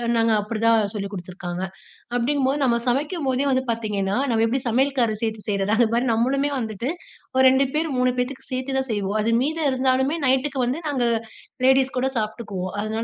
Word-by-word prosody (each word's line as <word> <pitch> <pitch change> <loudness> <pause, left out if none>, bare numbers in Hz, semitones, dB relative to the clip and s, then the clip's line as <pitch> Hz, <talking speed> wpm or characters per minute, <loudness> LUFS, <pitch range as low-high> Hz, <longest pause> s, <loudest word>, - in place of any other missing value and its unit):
நாங்க 230 0 +3
அப்டிதான் 225 +1 +2
சொல்லிக் 200 -1 -4
குடுத்துருக்காங்க. 180 -1 -5 0.5
அப்டிங்கும்போது 270 +3 +1
நம்ம 245 -3 +3
சமைக்கும்போதே 275 0 0
வந்து 260 0 +2
பார்த்தீங்கன்னா, 210 -4 -1
நம்ம 225 -1 +2
எப்டி 255 +4 0
சமையல்கார் 250 -1 +2
சேர்த்து 220 -1 -2
செய்றத, 200 0 0
அதுமாரி 235 +1 +2
நம்மளுமே 270 +5 +1
வந்துட்டு 225 +1 -3 0.5
ஒரு 260 - +5
2 265 +1 +3
பேர், 320 +1 +1
3 250 0 +3
பேத்துக்கு 250 +2 -3
சேர்த்து 260 +1 -2
தான் 265 0 -1
செய்வோம். 205 -1 -1
அது 230 +2 +1
மீத 315 +5 -1
இருந்தாலுமே, 260 +3 +1
நைட்டுக்கு 265 +1 +1
வந்து 265 +7 -2
நாங்க 265 -4 0 0.6
லேடீஸ் 265 -1 +4
கூட 265 +1 +1
சாப்பிட்டுக்குவோம். 215 -4 -3
அதனால 220 +1 -2
245 Hz, 160 wpm, -23 LUFS, 220-265 Hz, 0.6 s, ஒரு